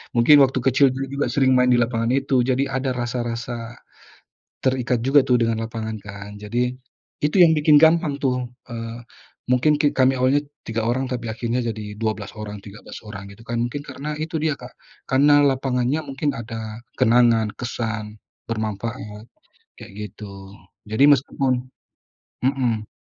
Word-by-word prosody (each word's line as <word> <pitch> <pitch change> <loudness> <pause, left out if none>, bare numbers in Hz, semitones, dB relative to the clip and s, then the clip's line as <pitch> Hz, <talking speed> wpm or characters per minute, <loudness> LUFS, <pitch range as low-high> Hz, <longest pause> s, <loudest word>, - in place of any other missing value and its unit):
mungkin 120 +6 +7
waktu 130 0 +1
kecil 130 +1 +3
dulu 135 +1 -4
juga 140 +2 -2
sering 130 -2 +3
main 125 0 +4
di 120 - +4
lapangan 115 0 0
itu. 135 -2 +2
Jadi, 130 +2 +1
ada 135 0 -2
rasa-rasa 120 -1 -4 0.9
terikat 125 -2 0
juga 135 +2 +4
tuh, 125 -1 +2
dengan 115 -1 0
lapangan 110 -1 -5
kan. 100 0 -9
Jadi, 120 +4 -2 0.5
itu 150 +5 +3
yang 160 -2 +7
bikin 150 -1 +5
gampang 160 -3 +3
tuh, 125 -2 0 0.2
eee, 115 0 -6 0.5
mungkin 145 +4 +3
ki 145 -2 +2
kami 130 0 +4
awalnya 140 +3 +3 0.2
3 115 0 -1
orang, 130 +3 0
tapi 120 -3 -4
akhirnya 120 +1 -2
jadi 105 -2 -5
12 110 -2 -3
orang, 105 -1 -7
13 100 +3 -11
orang, 100 -2 -9
gitu 100 - -17
kan, 120 - -2
mungkin 130 +4 -4
karena 150 +1 -6
itu 160 +1 -3
dia, 155 -3 -1
Kak. 125 0 -11 0.3
Karena 145 +2 +5
lapangannya 135 +1 +1
mungkin 140 0 -2
ada 115 0 -7 0.2
kenangan, 115 -2 +4
kesan, 110 -3 -4 0.2
bermanfaat, 110 -1 -5 0.6
kayak 110 -2 -11 0.2
gitu. 100 -2 -11 0.3
Jadi, 110 +7 +3
meskipun 135 -1 +3 0.9
mhm. 125 -5 0
125 Hz, 150 wpm, -22 LUFS, 110-135 Hz, 0.9 s, mungkin